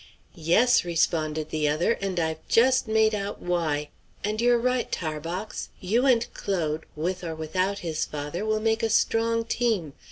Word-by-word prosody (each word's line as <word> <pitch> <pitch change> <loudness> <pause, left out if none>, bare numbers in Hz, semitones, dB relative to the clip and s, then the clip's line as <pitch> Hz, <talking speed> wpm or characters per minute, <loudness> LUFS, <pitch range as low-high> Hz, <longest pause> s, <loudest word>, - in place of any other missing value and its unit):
"Yes," 190 +10 +3
responded 155 -2 0
the 155 -1 +1
other, 155 +8 +1
"and 190 -2 -1
I've 160 -1 -1
just 255 +1 +4
made 220 0 +3
out 200 -1 -3
why! 155 -4 -1 0.3
And 215 +2 -1
you're 240 0 +4
right, 250 +1 0
Tarbox; 165 +5 -4
you 230 +8 +1
and 235 -3 +4
Claude, 160 -5 -2
with 180 +4 -2
or 165 -2 -4
without 185 +5 -1
his 160 -1 -1
father, 150 +5 -4
will 215 0 0
make 225 +1 +1
a 225 - +1
strong 230 +1 +2
team. 220 - 0
185 Hz, 160 wpm, -26 LUFS, 160-225 Hz, 0.3 s, just